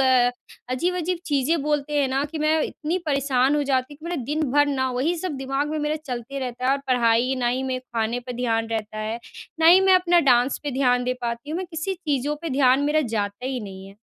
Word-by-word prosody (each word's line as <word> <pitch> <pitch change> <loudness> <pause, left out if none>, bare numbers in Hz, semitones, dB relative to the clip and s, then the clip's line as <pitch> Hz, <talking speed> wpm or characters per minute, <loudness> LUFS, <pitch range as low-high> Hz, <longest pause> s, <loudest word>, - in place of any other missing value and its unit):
अ, 255 -2 +4 0.4
अजीब-अजीब 355 +5 -1
चीज़ें 290 +2 +1
बोलते 295 0 -1
हैं 275 - +1
ना 270 +2 0
कि 320 - -4
मैं 310 +1 +2
इतनी 330 +4 -2
परेशान 275 -1 +2
हो 295 - +1
जाती 265 0 -1
हूँ, 285 - -19
कि 315 - -15
मेरा 340 -6 -3
दिन 300 +4 -1
भर 290 0 +4
ना 260 -2 0
वही 275 +8 0
सब 325 -5 -3
दिमाग 270 +2 -2
में 310 - -2
मेरा 300 +1 -1
चलते 250 +2 -5
रहता 250 -1 -5
है। - - +4
और 280 - +1
पढ़ाई 245 0 +2
ना 245 - 0
ही 255 +2 -1
मेरे 260 -1 -2 0.2
खाने 225 +2 0
पे 250 +1 -7
ध्यान 230 -2 -1
रहता 215 -1 -4
है, 220 +2 -3 0.4
ना 320 - +5
ही 360 +3 +8
मैं 385 -1 +5
अपना 355 -1 +4
डांस 245 +2 +3
पे 290 - -3
ध्यान 250 -1 +2
दे 250 - 0
पाती 235 +4 -4
हूँ, 320 - -2
मैं 375 - -4
किसी 325 +4 -3
चीज़ों 295 -4 -2
पे 330 - -3
ध्यान 265 0 +4
मेरा 310 +1 +3 0.2
जाता 205 +4 -3
ही 260 -1 -2
नहीं 195 -2 -9
है। 195 - -14
270 Hz, 240 wpm, -24 LUFS, 245-300 Hz, 0.4 s, ही